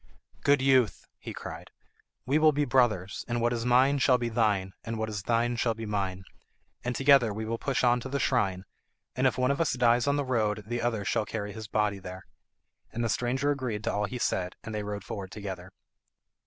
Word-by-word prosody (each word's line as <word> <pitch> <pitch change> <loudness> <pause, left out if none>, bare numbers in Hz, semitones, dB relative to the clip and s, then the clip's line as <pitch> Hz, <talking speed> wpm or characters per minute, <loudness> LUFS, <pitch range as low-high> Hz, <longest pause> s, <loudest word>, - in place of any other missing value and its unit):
"Good 140 -2 +4
youth," 130 -5 +3
he - - -7
cried, - - -8 0.6
"we 140 +5 +2
will 155 0 +6
be 145 0 0
brothers, 115 -7 +1
and 120 0 -1
what 120 +1 +1
is 115 0 -2
mine 130 +3 +4
shall 130 -2 +4
be 120 -1 -2
thine, 105 -5 +1
and 115 0 -4
what 110 0 -2
is 105 -2 -4
thine 120 +3 0
shall 115 -1 +1
be 115 0 -6
mine. 95 -3 -2 0.6
And 125 0 -2
together 135 -5 +5
we 110 +2 -4
will 115 +1 -3
push 135 -2 -1
on 120 0 +4
to 130 - -7
the 140 +1 -1
shrine, 95 -10 +1 0.5
and 130 +2 +3
if 130 - 0
one 130 +1 +2
of 140 - 0
us 165 - +1
dies 120 0 +3
on 140 - +3
the 145 -1 -1
road 110 -4 0
the 120 +2 -3
other 115 -4 -1
shall 105 - 0
carry 105 -2 -4
his 110 0 -7
body 105 -1 0
there." 95 0 -9 0.7
And 120 - -3
the 115 - 0
stranger 130 +5 0
agreed 125 -7 -3
to - - -1
all 105 0 0
he 125 +4 -5
said, 90 -6 -1
and 110 - -6
they 105 - -2
rode 105 -1 -5
forward 100 -2 -6
together. 95 -3 -7
115 Hz, 220 wpm, -28 LUFS, 105-130 Hz, 0.7 s, will